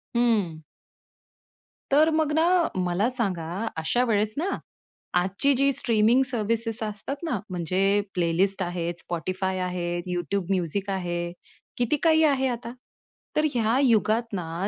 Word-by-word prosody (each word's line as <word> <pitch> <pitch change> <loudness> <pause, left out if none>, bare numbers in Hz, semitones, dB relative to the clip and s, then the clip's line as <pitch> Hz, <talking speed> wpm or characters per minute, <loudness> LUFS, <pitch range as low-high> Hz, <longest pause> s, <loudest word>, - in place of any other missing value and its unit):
हं. 210 -10 +1 1.3
तर 305 +3 +5
मग 315 -2 +1
ना, 320 +1 +3 0.3
मला 180 +5 +1
सांगा 200 -10 -2 0.3
अशा 160 +10 +1
वेळेस 215 -1 +1
ना 360 +6 0 0.7
आजची 195 +10 +1
जी 275 +2 +3
स्ट्रीमिंग 230 0 +3
सर्व्हिसेस 230 -2 -1
असतात 210 +5 -4
ना 255 -10 -1
म्हणजे 180 +1 -2 0.4
प्लेलिस्ट 185 +3 +1
आहेत, 175 -1 -2
Spotify 185 +3 -2
आहे, 180 -1 -2 0.2
YouTube 180 +1 -2
Music 190 +2 -2
आहे. 175 -2 -2 0.5
किती 245 +4 +1
काही 320 -1 +5
आहे 275 -3 +3
आता. 235 -1 -4 0.6
तर 305 - +3
ह्या 230 0 +2
युगात 225 -2 +3
ना 175 +1 -3
210 Hz, 125 wpm, -26 LUFS, 180-245 Hz, 1.3 s, तर